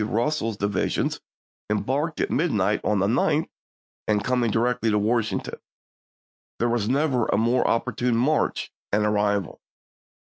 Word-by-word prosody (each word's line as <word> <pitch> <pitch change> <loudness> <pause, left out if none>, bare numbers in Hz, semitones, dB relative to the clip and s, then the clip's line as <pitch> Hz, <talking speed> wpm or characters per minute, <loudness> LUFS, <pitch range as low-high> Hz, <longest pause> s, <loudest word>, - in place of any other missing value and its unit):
Russell's 115 0 -1
divisions, 100 +1 -1 0.5
embarking 135 +9 -1
at - - -2
midnight 105 - +1
of 105 - +1
the 100 - +2
9th 135 +8 +1 0.6
and 105 -1 +1
coming 125 -2 +1
directly 115 +1 +1
to 105 - +2
Washington. 110 +1 -1 1.0
There 120 - +1
was 115 -2 0
never 135 -3 +1
a - - +1
more 120 +3 +2
opportune 120 0 0
march 145 +6 0 0.2
and 105 +1 +2
arrival. 105 -3 0
115 Hz, 130 wpm, -24 LUFS, 105-125 Hz, 1.0 s, the